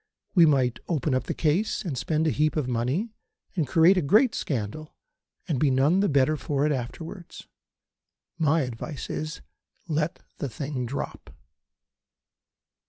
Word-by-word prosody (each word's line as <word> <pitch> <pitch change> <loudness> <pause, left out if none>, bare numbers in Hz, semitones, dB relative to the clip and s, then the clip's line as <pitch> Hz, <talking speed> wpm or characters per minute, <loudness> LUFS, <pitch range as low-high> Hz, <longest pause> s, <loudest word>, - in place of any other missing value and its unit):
We 170 -4 +7
might 130 -5 +2
open 155 -4 0
up 130 - 0
the - - -3
case, 175 +8 0
and 155 -7 -2
spend 155 +5 0
a 155 - +3
heap 155 +2 +1
of 150 -5 0
money, 130 - -1 0.4
and 160 -7 0
create 165 +7 +5
a - - +3
great 215 - +4
scandal, 140 +4 -4 0.5
and 150 -7 0
be 150 - +3
none 140 +8 +3
the 200 - +2
better 140 +1 +3
for 145 0 -1
it 150 - +2
afterwards. 160 +7 -6 0.9
My 160 0 +3
advice 130 +3 -5
is, 155 +1 -4 0.5
let 155 0 -1 0.2
the 140 - -2
thing 130 0 -4
drop." 140 +4 -5
150 Hz, 150 wpm, -26 LUFS, 130-165 Hz, 0.9 s, We